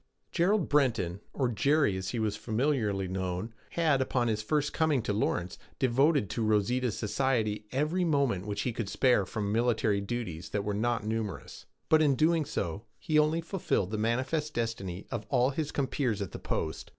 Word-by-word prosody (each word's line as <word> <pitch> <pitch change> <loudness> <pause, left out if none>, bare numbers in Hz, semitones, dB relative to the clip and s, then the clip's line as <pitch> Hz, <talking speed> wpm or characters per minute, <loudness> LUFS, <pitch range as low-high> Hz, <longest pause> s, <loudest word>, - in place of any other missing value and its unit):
Gerald 190 +1 +2
Breton, 115 -11 +1
or 130 - 0
'Jerry,' 140 0 +2
as 95 0 -3
he 120 - -3
was 110 -2 0
familiarly 110 -5 0
known, 95 +3 -3 0.2
had, 155 -5 +2
upon 125 -2 +1
his 110 -1 0
first 150 +6 0
coming 155 -7 +2
to 105 - -1
Lawrence, 90 -4 -1 0.2
devoted 135 0 +3
to 115 - -1
Rosita's 110 +3 +1
society 110 -3 0
every 155 +7 0
moment 140 - +1
which 100 -1 -2
he 125 - -1
could 110 -3 -3
spare 125 -8 +3
from 100 -2 -2
military 110 -3 +2
duties 100 -6 -4
that 100 -1 -2
were 105 0 -2
not 115 +1 0
numerous; 110 -1 -4 0.2
but 155 0 +5
in 145 -3 +4
so - - -1
doing 150 - 0 0.2
he 155 -1 +2
only 155 +2 +2
fulfilled 165 - -1
the 110 - -1
manifest 130 +7 -1
destiny 100 -6 -3
of 115 -2 -4
all 130 0 +3
his 145 +1 -3
compeers 130 -5 -1
at 100 -4 -4
the - - -7
post. 80 -1 -3
120 Hz, 175 wpm, -30 LUFS, 105-140 Hz, 0.2 s, but